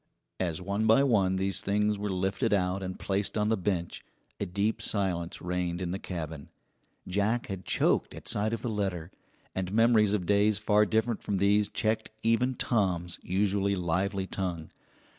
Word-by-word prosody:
As 90 -1 -2
one 100 +3 0
by 115 +5 +6
one 100 -8 +3
these 95 +1 0
things 105 +1 +1
were 105 0 -2
lifted 95 +5 0
out 95 0 +1
and 95 -1 -5
placed 100 +2 -1
on 105 0 +1
the 110 - +3
bench 90 -3 -2 0.4
a 100 - -2
deep 100 +4 -1
silence 90 -5 -2
reigned 90 -1 -2
in 90 -2 -3
the 95 - -3
cabin. 80 -6 -6 0.6
Jack 105 +5 0
had 95 -2 -5
choked - - +1
at - - -11
sight 105 +1 +1
of 115 - -3
the 120 - -1
letter, 95 -5 -2 0.4
and 95 -1 -3
memories 110 -1 +4
of 95 -4 0
days 100 +2 +3
far 105 0 +3
different 110 +2 0
from 100 - -1
these 100 +2 +3
checked 110 0 -1
even 120 +3 +2
Tom's 90 -8 0
usually 100 +1 +1
lively 95 +2 -1
tongue. 90 -4 -4
100 Hz, 170 wpm, -29 LUFS, 90-105 Hz, 0.6 s, by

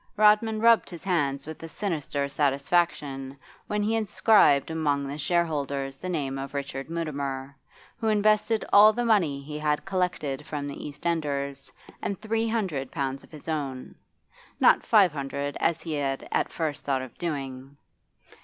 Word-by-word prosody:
Rodman 215 +1 +4
rubbed 230 0 +5
his 170 -3 -9
hands 145 -7 0
with 155 0 -8
a 165 - -7
sinister 150 -7 -2
satisfaction 140 -1 0 0.3
when 210 0 -1
he 220 +2 +1
inscribed 205 - +4
among 145 -3 0
the 140 +2 -5
shareholders 140 -5 -1
the 185 - -5
name 140 -6 -2
of 135 +1 -6
Richard 135 0 -4
Mutimer, 140 -4 -4 0.4
who 225 - -2
invested 215 +1 +2
all 210 +2 +9
the 240 +2 -1
money 170 -12 +2
he 150 +1 -6
had 150 -1 0
collected 180 -7 -1
from 145 -1 -4
the 140 - -6
East 145 +2 -11
Enders, 140 -4 -2 0.3
and 200 - -3
three 225 +1 -1
hundred 185 - -2
pounds 135 -1 -3
of - - -17
his 155 -1 -12
own 140 -5 -3 0.7
not - - +6
five 200 -7 +5
hundred, 140 0 -3
as 165 - 0
he 165 - -4
had 135 -2 -2
at - - 0
first 155 -4 -3
thought 135 -2 0
of 130 - -10
doing. 135 -4 -5
150 Hz, 160 wpm, -27 LUFS, 140-185 Hz, 0.7 s, all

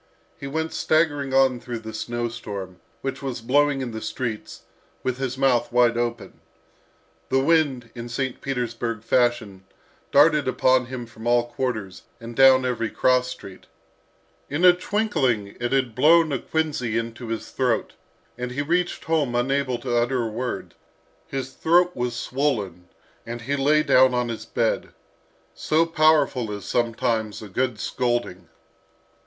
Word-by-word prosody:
He 140 - -8
went 160 +3 -3
staggering 145 -4 +1
on 130 -2 +3
through 120 0 -5
the 110 -1 -8
snow 120 +2 -3
storm, 100 -5 -7 0.2
which 135 +1 -4
was 130 -3 -4
blowing 140 +4 +2
in 125 -2 -4
the 110 0 -6
streets, 110 0 -5 0.4
with 130 0 -2
his 130 -1 -3
mouth 130 -4 +2
wide 120 -1 +4
open. 120 -1 -3 0.9
The 130 - +2
wind, 135 -6 +1
in 120 -1 -7
St. 130 +1 -3
Petersburg 120 -4 -3
fashion, 115 -6 0 0.5
darted 150 -1 +5
upon 130 0 +2
him 125 -1 -6
from 115 0 -9
all 120 0 +3
quarters, 110 -7 -3 0.2
and 115 0 -9
down 130 0 +6
every 115 -3 -1
cross 125 0 +2
street. 100 -7 -10 0.8
In 155 +6 +1
a 180 - +9
twinkling 175 - -1
it 120 0 -2
had 130 -4 +1
blown 155 +5 +5
a 135 - -1
quinsy 145 -8 -1
into 115 +1 -4
his 115 0 -5
throat, 125 -4 0 0.5
and 125 0 -3
he 135 +3 -2
reached 175 +4 -1
home 150 -7 0
unable 130 +1 0
to 120 -1 -3
utter 120 +1 +1
a 115 - -2
word. 125 +3 -4 0.5
His 135 -1 -4
throat 175 +5 +2
was 125 -1 -2
swollen, 115 - -2 0.4
and 120 0 -6
he 140 +5 -2
lay 150 +2 +3
down 130 -2 +5
on 125 -1 0
his 110 -1 -6
bed. 115 -1 -1 0.6
So 155 - +1
powerful 155 -8 +2
is 100 -1 -6
sometimes 115 -2 -1
a - - -8
good 120 +2 -1
scolding! 120 -6 -2
125 Hz, 150 wpm, -24 LUFS, 115-140 Hz, 0.9 s, a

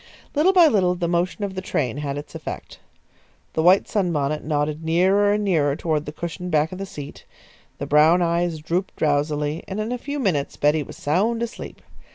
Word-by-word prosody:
Little 310 +6 +4
by 360 -3 +6
little 190 - +3
the 175 -1 -2
motion 175 +4 -1
of 200 -1 -3
the 185 - -4
train 130 -8 -2
had 145 -1 -3
its 145 - -8
effect. - - -7 0.7
The 160 - 0
white 180 +4 +5
sunbonnet 155 -7 -1
nodded 150 +1 -1
nearer 190 +5 +3
and 210 0 0
nearer 150 -8 +2
toward 155 -2 -2
the - - -4
cushioned 170 +3 -6
back 155 -1 +1
of 185 - -7
the 195 - -5
seat; 145 -7 -9 0.5
the - - -4
brown 155 +4 +5
eyes 170 0 0
drooped 170 +5 -3
drowsily, 150 +1 0
and 195 +2 -4
in 215 +2 -2
a 250 - -3
few 285 +3 -5
minutes 180 - -1
Betty 150 +1 +2
was 145 - -9
sound 215 +10 0
asleep. 235 - -7
170 Hz, 195 wpm, -23 LUFS, 150-195 Hz, 0.7 s, by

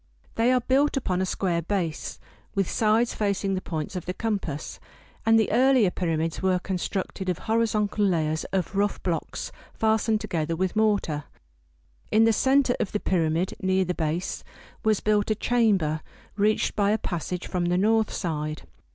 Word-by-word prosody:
They 230 +2 +2
are 255 -1 +3
built 275 +4 +2
upon 185 -8 0
a 190 - 0
square 175 -3 0
base, 170 -3 -3 0.4
with 195 -2 +1
sides 225 +2 +2
facing 200 -2 0
the 185 - -1
points 160 +1 -4
of 180 - -5
the 180 - -3
compass, 195 -9 -3 0.5
and 225 0 +6
the 220 - +1
earlier 250 -4 +4
pyramids 165 -2 -1
were 185 -1 +2
constructed 190 +1 -3
of 180 - 0
horizontal 220 -2 0
layers 160 -4 0
of 190 0 -2
rough 205 +1 0
blocks 170 -3 -3 0.2
fastened 220 0 +2
together 165 -6 -2
with 185 +3 -1
mortar. 205 -9 +1 0.8
In 220 +1 +4
the 225 0 +4
center 265 +2 +3
of 195 - -2
the 210 - 0
pyramid, 170 -1 0
near 190 0 +2
the 180 - -1
base, 165 +2 -2 0.4
was 215 -3 +2
built 210 0 +1
a 215 - +2
chamber 200 -10 +1 0.3
reached 210 +1 +1
by 205 -1 +2
a 215 - +3
passage 180 -2 -4
from 180 -1 -1
the 175 +1 +1
north 220 +2 +2
side. 155 -3 -3
195 Hz, 165 wpm, -26 LUFS, 175-220 Hz, 0.8 s, and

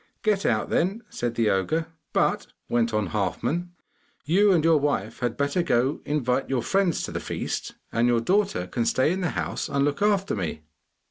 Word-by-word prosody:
'Get 210 -3 +2
out, 110 -2 0
then!' 195 +7 0
said 120 -1 -3
the 115 -2 +2
ogre. 125 - 0 0.3
'But,' - - +1 0.2
went 120 -1 +1
on 105 -4 0
Halfman, 125 - -1 0.6
'you 195 +7 +4
and 170 -5 +3
your 165 -2 +5
wife 115 -7 -1
had 120 -1 -2
better 145 +5 +1
go 135 -4 +1
to - - -15
invite 135 -3 0
your 130 -3 0
friends 190 +4 +1
to - - -4
the - - -3
feast, - - -4 0.2
and 115 +1 +2
your 120 -1 +3
daughter 195 - +1
can 115 +5 -2
stay 130 +4 +2
in 190 +1 -1
the 175 - 0
house - - -2
and 140 0 +1
look 145 +4 -1
after 200 -2 +2
me! 85 -5 -4
140 Hz, 195 wpm, -25 LUFS, 115-175 Hz, 0.6 s, your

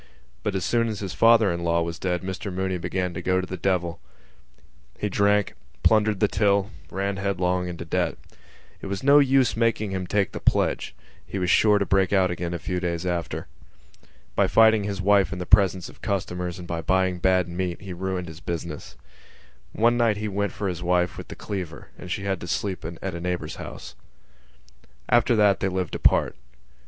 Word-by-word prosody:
But 105 -2 -2
as 95 - -1
soon 115 -1 +2
as 110 -3 -4
his 95 -3 -4
father 115 +2 +5
in 85 0 -4
law 85 0 +2
was 85 +1 -5
dead 90 -1 -1
Mr 95 +2 -4
Mooney 95 0 -2
began 90 0 -2
to 90 - -5
go 95 +1 +1
to 95 - -2
the 95 - -5
devil. 90 -2 -1 1.0
He 105 - -2
drank, 100 +1 +2 0.3
plundered 105 -2 +3
the 105 - +4
till, 100 -1 +1 0.2
ran 100 +1 -2
headlong 90 -2 0
into 85 -1 -6
debt. 80 - -1 0.6
It - - -6
was 100 +3 -4
no 140 +2 +7
use 135 -2 +3
making 115 -3 0
him 95 -1 -3
take 100 0 +1
the - - -6
pledge: - - 0 0.3
he - - -6
was 90 -1 +1
sure 105 -1 +5
to 100 - 0
break 95 -1 +2
out 95 -2 +3
again 85 -1 -3
a 85 - -2
few 90 +2 -3
days 85 -1 -2
after. 85 -2 -3 0.9
By - - +3
fighting 110 -2 +5
his 100 -1 -3
wife 100 0 +4
in 95 - -4
the 90 - -4
presence 95 -2 +4
of - - -15
customers 90 -3 -3
and 90 -1 -9
by 85 -1 -3
buying 95 0 +1
bad 95 -1 +2
meat 85 0 -3
he 95 -2 -7
ruined 90 0 -3
his 80 0 -10
business. 85 -2 -6 0.8
One 120 +2 +2
night 115 -3 +2
he 105 +1 -3
went 100 0 -1
for 100 - -4
his 90 -2 -3
wife 90 0 +1
with - - -8
the - - -8
cleaver 90 -7 -6
and 90 - -10
she 95 - -2
had 95 -3 -2
to 85 - -6
sleep 95 +1 -2
in 85 +1 -6
a 95 -3 -3
neighbour's 90 0 -3
house. 60 - -8 1.2
After 120 0 +4
that 105 -2 +4
they 95 - 0
lived 95 -1 -3
apart. - - +2
95 Hz, 200 wpm, -25 LUFS, 90-100 Hz, 1.2 s, no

